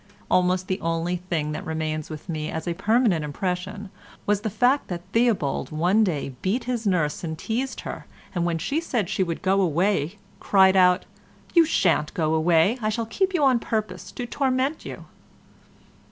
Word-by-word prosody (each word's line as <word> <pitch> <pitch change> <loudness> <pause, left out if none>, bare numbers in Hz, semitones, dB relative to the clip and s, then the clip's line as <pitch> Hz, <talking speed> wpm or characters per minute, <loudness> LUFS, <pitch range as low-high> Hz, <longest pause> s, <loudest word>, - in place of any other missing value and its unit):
Almost 185 0 +2
the 185 - -2
only 165 +2 -1
thing 170 -4 -2
that 155 - -4
remains 155 -1 -3
with 155 +1 -8
me 155 -3 -3
as 160 +2 -5
a 170 - 0
permanent 215 -3 +2
impression 185 +6 -4 0.3
was 205 0 +1
the 220 - -2
fact 245 +7 +2
that 175 -2 -5
Theobald 225 - +1
one 175 +8 +2
day 150 -8 -2
beat 225 +7 0
his 235 -3 -2
nurse 165 -6 0
and 160 -2 -4
teased 250 +8 -3
her, - - -7 0.3
and 175 -3 0
when 170 -1 0
she 280 - -1
said 235 - -1
she 190 - +1
should 170 -2 -4
go 195 +1 +3
away 180 +1 +1 0.2
cried 190 -1 +4
out, 180 0 +4 0.5
"You 335 -2 +6
shan't 150 - +1
go 160 -2 +1
away—I'll 205 +8 +2
keep 380 - 0
you 310 - +2
on 260 -3 +4
purpose 215 -2 -3
to 245 - -4
torment 265 +3 -1
you." - - -8
185 Hz, 170 wpm, -24 LUFS, 165-225 Hz, 0.5 s, You